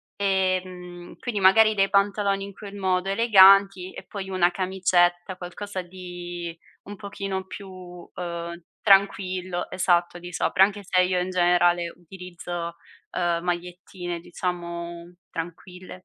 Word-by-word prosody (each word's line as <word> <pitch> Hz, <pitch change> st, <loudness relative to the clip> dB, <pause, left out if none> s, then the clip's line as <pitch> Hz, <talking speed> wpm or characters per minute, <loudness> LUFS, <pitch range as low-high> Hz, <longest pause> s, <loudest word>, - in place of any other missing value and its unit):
Ehm, 185 Hz, -2 st, -2 dB
quindi 215 Hz, -5 st, -3 dB
magari 215 Hz, +3 st, +6 dB
dei 195 Hz, -1 st, +2 dB
pantaloni 200 Hz, 0 st, +1 dB
in 200 Hz, -, -10 dB
quel 200 Hz, 0 st, -10 dB
modo 190 Hz, -1 st, 0 dB
eleganti 195 Hz, -3 st, +6 dB
e -, -, -9 dB
poi 195 Hz, -2 st, -7 dB
una 180 Hz, -1 st, +2 dB
camicetta, 180 Hz, -1 st, +1 dB
qualcosa 185 Hz, +2 st, -6 dB
di 175 Hz, -2 st, -8 dB, 0.3 s
un 205 Hz, -, -9 dB
pochino 195 Hz, -2 st, -5 dB
più, 195 Hz, +1 st, -9 dB
uhm, 175 Hz, -1 st, -8 dB, 0.2 s
tranquillo, 185 Hz, -3 st, +2 dB
esatto, 175 Hz, -1 st, +1 dB
di 175 Hz, 0 st, -9 dB
sopra, 190 Hz, +2 st, +3 dB
anche 205 Hz, +1 st, +1 dB
se 185 Hz, -1 st, +2 dB
io 180 Hz, 0 st, +1 dB
in 185 Hz, -, -3 dB
generale 175 Hz, -1 st, +3 dB
utilizzo, 175 Hz, -1 st, -7 dB, 0.4 s
uhm, 170 Hz, -1 st, 0 dB
magliettine, 175 Hz, 0 st, -4 dB
diciamo, 170 Hz, 0 st, -5 dB, 0.2 s
tranquille. 180 Hz, +2 st, -8 dB
180 Hz, 125 wpm, -25 LUFS, 175-195 Hz, 0.4 s, magari